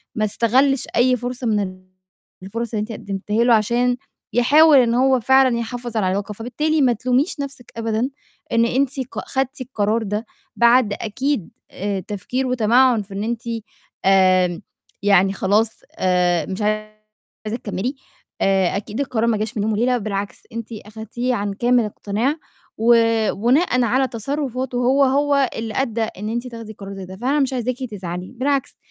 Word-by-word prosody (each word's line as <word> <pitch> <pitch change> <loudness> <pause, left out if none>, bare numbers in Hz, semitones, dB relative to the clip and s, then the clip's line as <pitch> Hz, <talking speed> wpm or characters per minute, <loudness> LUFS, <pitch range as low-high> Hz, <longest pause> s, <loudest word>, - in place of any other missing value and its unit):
ما 215 - +1
استغلِّش 255 +6 +2
أي 250 +1 +4
فرصة 245 +1 -4
من 215 -2 +2
ال 185 -2 -5 0.6
الفُرَص 230 +5 -4
اللي 215 - 0
أنتِ 215 +2 -5
قدّمتيها 210 +1 -2
له 240 0 +5
عشان 240 +3 +2 0.4
يحاول 290 +6 +6
إن 240 -3 +4
هو 260 +1 +3
فعلًا 260 +1 +4
يحافظ 235 0 -4
على 200 -4 +1
العلاقة، 200 +3 -2
فبالتالي 300 +8 -1
ما 250 -3 +4
تلوميش 255 - 0
نَفْسِك 280 -4 -6
أبدًا، 225 +2 -1 0.4
إن 230 0 +3
أنتِ 270 +3 0
ق - - -5
خدتي 265 +1 -2
القرار 225 -2 0
ده، 210 +2 -3 0.3
بعد 235 -2 +4
أكيد 225 - -2 0.2
آآ، 200 0 -3
تفكير 210 +7 -3
وتَمَعُّن 245 0 +3
في 200 0 -11
إن 200 +1 -3
أنتِ 230 +1 -2 0.6
آمم، 185 -2 +4 0.4
يعني 195 -1 +4
خلاص 210 +3 +1 0.2
آآ، 180 -2 +2
مش 190 +2 -5
عايزة 215 +1 -5
تكمّلي، 215 +6 -3 0.5
آآ، 190 -1 +2
أكيد 210 +3 -6
القرار 240 -5 0
ما 225 -2 +2
جاش 220 +3 -3
من 205 - 0
يوم 220 - 0
وليلة، 245 +4 +2
بالعكس 200 -2 -4
أنتِ 230 -1 -5 0.2
أخدتيه 225 +4 -3
عن 205 -2 -2
كامل 240 +2 +2
اقتناع، 215 +6 -1 0.4
وبناءً 230 - +3
على 260 +3 +2
تصرّفاتُه 255 +1 -3
هو، 260 +3 +3
هو 280 0 +2
اللي 225 -1 -4
أدّى 235 -4 -1
إن 210 -1 -5
أنتِ 240 +2 -3
تاخدي 230 -3 -8
قرار 200 -1 -9
زي 195 -1 -7
ده، 185 +1 -9
فأنا 265 +7 0
مش 270 -1 +1
عايزاكِ 250 0 -1 0.2
تزعلي، 180 -2 -6
بالعكس 275 +1 0
230 Hz, 160 wpm, -21 LUFS, 205-255 Hz, 0.6 s, يحاول